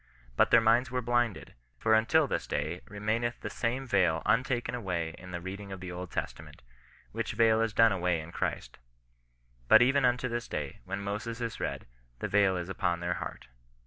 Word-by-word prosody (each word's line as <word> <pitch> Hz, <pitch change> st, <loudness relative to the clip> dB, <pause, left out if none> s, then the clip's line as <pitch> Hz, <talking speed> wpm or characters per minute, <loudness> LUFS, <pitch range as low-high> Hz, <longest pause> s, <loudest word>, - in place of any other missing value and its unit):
But -, -, +4 dB
their 120 Hz, -, +7 dB
minds 115 Hz, +3 st, +3 dB
were 125 Hz, 0 st, -2 dB
blinded; 120 Hz, -3 st, 0 dB, 0.2 s
for 110 Hz, -, +2 dB
until 125 Hz, +9 st, +4 dB
this -, -, -3 dB
day, 85 Hz, +4 st, -2 dB
re 100 Hz, -, -10 dB
maincth 115 Hz, +3 st, -1 dB
the -, -, -5 dB
same 125 Hz, +3 st, -2 dB
veil 90 Hz, -8 st, +2 dB
untaken 120 Hz, +4 st, +1 dB
away 90 Hz, -8 st, -2 dB
in 90 Hz, -, -11 dB
the 90 Hz, -1 st, -4 dB
reading 100 Hz, +3 st, -7 dB
of 95 Hz, -, -6 dB
the 90 Hz, 0 st, -7 dB
Old 90 Hz, 0 st, -6 dB
Testament; -, -, -6 dB, 0.5 s
which -, -, -3 dB
veil 110 Hz, 0 st, +4 dB
is 115 Hz, -1 st, +1 dB
done 115 Hz, +1 st, +5 dB
away 90 Hz, -3 st, 0 dB
in 80 Hz, +2 st, -9 dB
Christ -, -, -4 dB, 0.9 s
But 110 Hz, -, +8 dB
even 135 Hz, +2 st, +3 dB
unto 125 Hz, 0 st, +2 dB
this 120 Hz, 0 st, -3 dB
day, -, -, -5 dB
when 100 Hz, +2 st, -4 dB
Moses 105 Hz, +4 st, -4 dB
is 115 Hz, -1 st, -4 dB
read, -, -, -3 dB, 0.3 s
the -, -, -3 dB
veil 100 Hz, -2 st, +3 dB
is 90 Hz, -1 st, -4 dB
upon 90 Hz, -2 st, -1 dB
their 85 Hz, +1 st, -1 dB
heart." -, -, -7 dB
105 Hz, 195 wpm, -30 LUFS, 90-120 Hz, 0.9 s, But